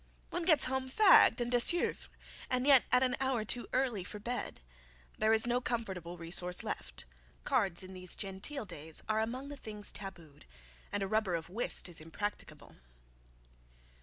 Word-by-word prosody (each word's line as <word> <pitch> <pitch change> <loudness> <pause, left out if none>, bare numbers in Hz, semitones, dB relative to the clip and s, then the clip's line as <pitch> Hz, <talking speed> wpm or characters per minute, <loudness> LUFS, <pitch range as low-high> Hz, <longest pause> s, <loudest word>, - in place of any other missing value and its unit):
One 350 -1 -3
gets 315 -4 +6
home 260 0 -1
fagged 370 - +6
and 240 0 -2
desouvre, 250 +8 +2 0.4
and 255 0 0
yet 275 -3 +6
at 250 +1 +4
an 250 -1 +1
hour 260 -5 -1
too 240 +3 -1
early 250 -7 0
for 210 - -8
bed. 240 +4 -5 0.6
There 215 0 +3
is 220 0 +3
not 245 +1 0
comfortable 190 -8 -4
resource 175 +1 -2
left. - - -6 0.4
Cards 200 - 0
in 185 0 -9
these 185 -1 0
genteel 205 +7 -4
days 160 -3 -4
are 215 0 0
among 250 +5 -3
the 290 - -8
things 210 -4 0
tabooed, 170 - -11 0.4
and 205 -1 -1
a - - -2
rubber 215 -3 0
of 165 0 -5
whist 215 +2 +3
is 170 -3 -2
impracticable. 205 +6 -7
220 Hz, 165 wpm, -32 LUFS, 185-255 Hz, 0.6 s, gets